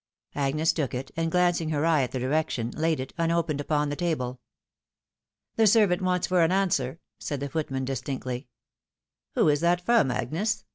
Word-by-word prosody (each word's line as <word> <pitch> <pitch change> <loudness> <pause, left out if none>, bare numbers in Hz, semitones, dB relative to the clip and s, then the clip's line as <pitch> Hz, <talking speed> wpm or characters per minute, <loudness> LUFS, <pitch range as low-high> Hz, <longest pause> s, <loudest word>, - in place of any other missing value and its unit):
Agnes 150 +4 +1
took 145 -6 -2
it, 130 +2 -5
and 165 0 -1
glancing 175 -2 +2
her 150 0 0
eye 160 -3 +4
at 125 - -2
the - - -3
direction, 130 -3 -1
laid 160 +1 0
it, 130 +1 -6
unopened, 165 -3 0
upon 150 0 0
the 145 - -2
table. 130 -7 -2 0.6
" - - -62
The 225 -1 +5
servant 205 -4 +4
waits 180 -1 +1
for 180 -1 +2
an 165 +1 +3
answer," 165 -7 0 0.2
said 145 - -4
the 140 +1 -4
footman, 135 -3 -2
distinctly. 130 0 -4 0.4
" - - -55
Who - - +3
is 145 -1 +3
that 175 +2 +2
from, 225 - +3
Agnes 170 - -2
155 Hz, 185 wpm, -26 LUFS, 135-175 Hz, 0.6 s, The